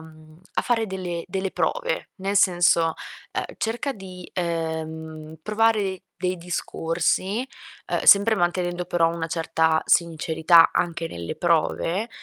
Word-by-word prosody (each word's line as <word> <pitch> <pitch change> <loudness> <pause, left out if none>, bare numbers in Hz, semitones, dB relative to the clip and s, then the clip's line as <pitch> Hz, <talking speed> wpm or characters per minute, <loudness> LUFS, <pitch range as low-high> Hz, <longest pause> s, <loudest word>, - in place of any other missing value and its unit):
mhmm, 155 0 -16 0.2
fare 230 -2 +1
delle 180 -3 -4
delle 190 +1 -3
prove, - - -2
nel 195 0 -2
senso: 175 -3 +4 0.4
uhm, - - -2
cerca 240 +5 -2
di, 185 -3 -10
ehm, 160 -2 -4
provare 210 -3 +1 0.2
dei 185 0 -1
discorsi, 175 +5 -1 0.4
uhm, - - 0
sempre 205 +3 +7
mantenendo 175 -1 -1
però 175 -2 +2
una 165 -1 -3
certa 160 -1 +1
sincerità 165 0 +4
anche 170 -1 -1
nelle 85 - -6
prove, 170 +4 0
175 Hz, 120 wpm, -24 LUFS, 160-195 Hz, 0.4 s, sempre